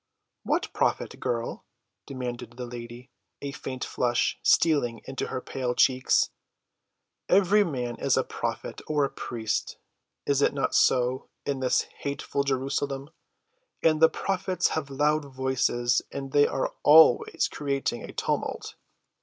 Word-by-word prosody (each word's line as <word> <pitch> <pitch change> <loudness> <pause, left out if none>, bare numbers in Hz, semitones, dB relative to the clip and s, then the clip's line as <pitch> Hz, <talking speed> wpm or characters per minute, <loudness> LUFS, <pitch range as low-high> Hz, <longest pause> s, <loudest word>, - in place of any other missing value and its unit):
"What - - -1
prophet, - - -1
girl?" 115 -1 -3 0.4
demanded 125 -3 -6
the 125 - -4
lady, 120 +1 -9 0.3
a 140 - -5
faint 130 -2 -6
flush 120 -1 0
stealing 140 -8 +3
into 135 -1 -4
her 130 - -3
pale 125 -2 -3
cheeks. 130 0 +3 1.0
"Every 200 +2 +5
man 125 - -3
is - - +2
a - - +3
prophet—or 150 -2 -2
a - - -5
priest, 110 -2 -3 0.5
is 140 -1 +2
it - - +2
not 135 - 0
so, 125 +1 +2 0.2
in 140 -2 -1
this 130 -1 +2 0.2
hateful 140 0 -2
Jerusalem? 135 +1 -2 0.7
And 155 -1 +3
the 160 - +8
prophets 190 0 -1
have 155 -3 -3
loud 150 +2 +1
voices, 130 -2 0
and 135 -1 -6
they 145 +1 +5
are - - -2
always 150 -3 +6
creating 140 -4 -2
a - - -8
tumult." - - -3
135 Hz, 130 wpm, -27 LUFS, 125-145 Hz, 1.0 s, the